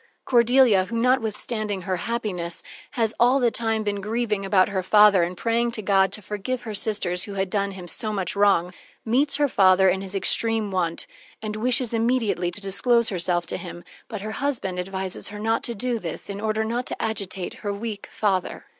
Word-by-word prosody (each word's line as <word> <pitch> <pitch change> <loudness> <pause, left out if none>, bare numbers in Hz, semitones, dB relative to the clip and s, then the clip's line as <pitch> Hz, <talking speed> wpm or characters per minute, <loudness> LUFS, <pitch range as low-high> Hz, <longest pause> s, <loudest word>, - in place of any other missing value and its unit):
Cordelia 240 -5 +4
who, 230 +3 -4
notwithstanding 220 -4 -1
her 185 -1 -2
happiness, 185 -6 -4 0.3
has 225 -4 0
all 250 +3 +4
the 240 -3 +2
time 225 -1 0
been 205 -1 -2
grieving 215 -1 -1
about 195 -1 +3
her 195 -2 -1
father 205 0 +5
and 175 +1 -2
praying 235 +2 +1
to 215 - -4
God 195 -1 +3
to 210 - -4
forgive 210 +5 -4
her 220 - -6
sisters 200 -4 +1
who 200 - -8
had 190 -1 -2
done 200 -1 -1
him 180 -2 -9
so 215 +5 0
much 195 -3 -2
wrong 195 -3 +3 0.3
meets 270 +6 +2
her 290 0 +2
father 190 -5 +4
in 190 +1 0
his 195 0 -5
extreme 220 +1 +1
want, 175 -3 -1 0.3
and 215 -1 -5
wishes 240 +1 +1
immediately 225 -6 +1
to 175 - -5
disclose 225 +4 +2
herself 175 -2 0
to - - -2
him, 175 -1 -9 0.2
but 215 -3 -6
her 215 +1 -5
husband 225 -8 -2
advises 190 0 -4
her 210 - -8
not 225 +2 0
to 235 - -2
do 240 +2 -1
this, 170 +2 -5
in 200 +1 -6
order 220 0 0
not 235 +3 -3
to - - -3
agitate 195 -4 -3
her 205 - -2
weak 205 0 -5
father. 195 -4 -1
210 Hz, 195 wpm, -24 LUFS, 190-230 Hz, 0.3 s, father